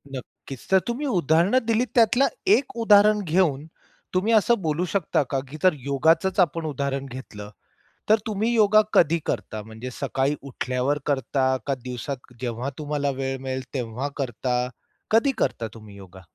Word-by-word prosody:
नक्कीच. 130 Hz, 0 st, -10 dB
तर 190 Hz, -, +6 dB
तुम्ही 250 Hz, +5 st, -2 dB
उदाहरणं 180 Hz, -, +2 dB
दिलीत 230 Hz, +2 st, +2 dB
त्यातला 240 Hz, +4 st, +4 dB, 0.3 s
एक 265 Hz, -3 st, -5 dB
उदाहरण 210 Hz, 0 st, +6 dB
घेऊन 155 Hz, -4 st, +1 dB, 0.5 s
तुम्ही 205 Hz, +5 st, +1 dB
असं 220 Hz, 0 st, +3 dB
बोलू 160 Hz, +2 st, -1 dB
शकता 175 Hz, -6 st, +1 dB
का? 135 Hz, +1 st, -2 dB
की 155 Hz, -, -8 dB
जर 185 Hz, -, +5 dB
योगाचच 160 Hz, +7 st, +2 dB
आपण 165 Hz, -2 st, +2 dB
उदाहरण 140 Hz, -1 st, -2 dB
घेतलं, 115 Hz, -6 st, -9 dB, 0.6 s
तर 215 Hz, -, +6 dB
तुम्ही 220 Hz, +2 st, 0 dB
योगा 215 Hz, -1 st, +5 dB
कधी 165 Hz, 0 st, +4 dB
करता? 110 Hz, -1 st, -3 dB
म्हणजे 110 Hz, +4 st, -8 dB
सकाळी 135 Hz, +2 st, 0 dB
उठल्यावर 130 Hz, +1 st, -2 dB
करता 130 Hz, -1 st, +1 dB
का 140 Hz, -1 st, 0 dB
दिवसात 125 Hz, +1 st, -6 dB
जेव्हा 120 Hz, +2 st, -3 dB
तुम्हाला 145 Hz, -2 st, -2 dB
वेळ 135 Hz, 0 st, -2 dB
मिळेल 130 Hz, 0 st, -4 dB
तेव्हा 125 Hz, +1 st, -3 dB
करता? 125 Hz, -1 st, -1 dB, 0.5 s
कधी 230 Hz, +5 st, +4 dB
करता 115 Hz, -, -1 dB
तुम्ही 105 Hz, -3 st, -13 dB
योगा? 95 Hz, -1 st, -13 dB
145 Hz, 150 wpm, -24 LUFS, 130-195 Hz, 0.6 s, तर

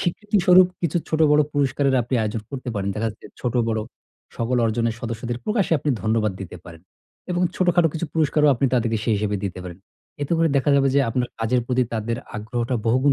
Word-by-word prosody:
স্বীকৃতিস্বরূপ 185 Hz, -1 st, +4 dB
কিছু 170 Hz, -1 st, 0 dB
ছোট 155 Hz, -, -1 dB
বড় 150 Hz, -, +5 dB
পুরস্কারের 140 Hz, -1 st, +1 dB
আপনি 120 Hz, +3 st, -3 dB
আয়োজন 110 Hz, 0 st, -3 dB
করতে 130 Hz, -2 st, -6 dB
পারেন। 100 Hz, -1 st, -2 dB
দেখা 110 Hz, +1 st, -1 dB
যাচ্ছে 105 Hz, -, -14 dB
ছোট 125 Hz, -3 st, -2 dB
বড় 110 Hz, -1 st, 0 dB, 0.6 s
সকল 120 Hz, +2 st, 0 dB
অর্জনের 115 Hz, 0 st, 0 dB
সদস্যদের 115 Hz, +1 st, -4 dB
প্রকাশ্যে 210 Hz, -6 st, +1 dB
আপনি 145 Hz, -, -1 dB
ধন্যবাদ 110 Hz, -1 st, +1 dB
দিতে 90 Hz, -2 st, -7 dB
পারেন। 85 Hz, -1 st, -12 dB, 0.5 s
এবং 175 Hz, 0 st, 0 dB
ছোটখাটো 175 Hz, -2 st, +3 dB
কিছু 165 Hz, +1 st, -2 dB
পুরস্কারও 150 Hz, -1 st, +3 dB
আপনি 130 Hz, +3 st, +1 dB
তাদেরকে 115 Hz, -2 st, +1 dB
সেই 115 Hz, -, +2 dB
হিসেবে 105 Hz, 0 st, -1 dB
দিতে 95 Hz, -2 st, -4 dB
পারেন। 90 Hz, -1 st, -8 dB, 0.4 s
এতে 145 Hz, -, -2 dB
করে 165 Hz, 0 st, +3 dB
দেখা 140 Hz, +1 st, +2 dB
যাবে 135 Hz, 0 st, +3 dB
যে 140 Hz, -, +5 dB
আপনার 125 Hz, +1 st, -1 dB
কাজের 120 Hz, +2 st, +1 dB
প্রতি 125 Hz, 0 st, +2 dB
তাদের 115 Hz, +1 st, -2 dB, 0.2 s
আগ্রহটা 120 Hz, +3 st, -3 dB
বহুগুণ 130 Hz, +5 st, +3 dB
125 Hz, 190 wpm, -22 LUFS, 110-150 Hz, 0.6 s, বড়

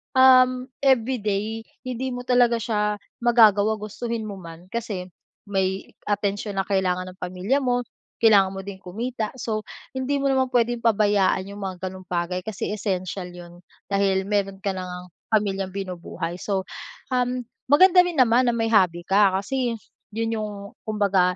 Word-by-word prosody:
um, 255 Hz, -1 st, +6 dB, 0.2 s
everyday 225 Hz, -4 st, +1 dB, 0.2 s
hindi 255 Hz, +1 st, -3 dB
mo 245 Hz, -, -4 dB
talaga 245 Hz, -2 st, +4 dB
siya 210 Hz, -2 st, -1 dB, 0.2 s
magagawa, 220 Hz, -3 st, +5 dB
gustuhin 225 Hz, +2 st, -4 dB
mo 205 Hz, -, -6 dB
man 170 Hz, 0 st, -11 dB
kasi 210 Hz, -5 st, -4 dB, 0.4 s
may 190 Hz, -1 st, -1 dB, 0.2 s
atensyon 205 Hz, 0 st, -1 dB
na 195 Hz, -, -1 dB
kailangan 185 Hz, -2 st, 0 dB
ng 185 Hz, -, -19 dB
pamilya 185 Hz, +9 st, 0 dB
mo, 245 Hz, -1 st, +1 dB, 0.4 s
kailangan 200 Hz, -4 st, +5 dB
mo 195 Hz, -, -6 dB
ding 200 Hz, -1 st, -7 dB
kumita. 220 Hz, +4 st, -4 dB
So, 215 Hz, -3 st, -2 dB, 0.3 s
hindi 265 Hz, +2 st, -1 dB
mo 275 Hz, -, +1 dB
naman 260 Hz, -1 st, +1 dB
pwedeng 240 Hz, -1 st, +1 dB
pabayaan 205 Hz, -4 st, +2 dB
yung 200 Hz, 0 st, -7 dB
mga 185 Hz, -1 st, -4 dB
ganong 185 Hz, 0 st, -11 dB
bagay 180 Hz, +1 st, -2 dB
kasi 220 Hz, -2 st, -4 dB
essential 185 Hz, -2 st, -3 dB
yun 175 Hz, 0 st, -12 dB, 0.3 s
dahil 195 Hz, -1 st, +1 dB
meron 200 Hz, -2 st, -1 dB
ka 200 Hz, -, 0 dB
na 185 Hz, -, -4 dB
ngang 180 Hz, 0 st, -8 dB, 0.2 s
pamilyang 195 Hz, -3 st, 0 dB
binubuhay. 180 Hz, -3 st, -5 dB
So, 190 Hz, 0 st, -2 dB, 0.5 s
um, 250 Hz, 0 st, 0 dB, 0.3 s
maganda 360 Hz, +4 st, +7 dB
rin 345 Hz, -5 st, -2 dB
naman 250 Hz, 0 st, +5 dB
na -, -, -4 dB
may 225 Hz, -1 st, 0 dB
hobby 180 Hz, -6 st, +3 dB
ka 195 Hz, 0 st, +4 dB
kasi 240 Hz, +1 st, -2 dB, 0.3 s
yun 225 Hz, +1 st, -1 dB
yung 215 Hz, -1 st, -3 dB, 0.3 s
kumbaga 195 Hz, -4 st, +2 dB
205 Hz, 155 wpm, -24 LUFS, 190-235 Hz, 0.5 s, maganda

